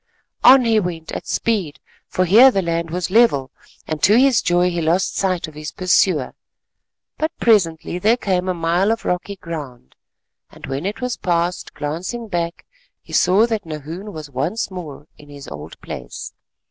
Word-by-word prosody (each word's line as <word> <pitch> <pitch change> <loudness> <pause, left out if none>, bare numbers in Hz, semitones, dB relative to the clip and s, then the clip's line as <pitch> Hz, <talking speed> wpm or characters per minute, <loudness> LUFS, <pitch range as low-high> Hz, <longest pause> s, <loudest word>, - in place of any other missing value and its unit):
On 255 0 +8
he 225 -1 +3
went 170 -4 -4
at - - -6
speed 195 -10 -1 0.3
for 185 - 0
here 225 +9 +8
the 195 -7 0
land 170 0 -2
was 180 +2 -3
level, 190 - +3 0.3
and 155 -2 -4
to 210 +4 +5
his 265 -2 +4
joy 175 0 +2
he 170 -1 -2
lost 170 +4 +1
sight 185 -4 0
of 155 - -12
his 150 +1 -7
pursuer. 180 -5 +2 0.9
But 315 +1 0
presently 180 -6 +2
there 220 +6 +3
came 185 -5 -1
a 185 - 0
mile 170 +5 +1
of 225 - -3
rocky 180 +3 -2
ground, 145 - -8 0.6
and - - -11
when 135 +6 -3
it 205 - -5
was 250 -1 -2
past, 175 0 -1
glancing 170 +11 -4
back 170 -2 -3 0.3
he - - -15
saw 190 +5 +4
that 220 -3 -2
Nahoon 160 +6 -7
was 155 -5 -8
once 155 - -2
more 155 -6 -8
in 145 - -15
his 145 -1 -11
old 70 +1 -9
place. 60 - -8
180 Hz, 170 wpm, -20 LUFS, 160-205 Hz, 0.9 s, On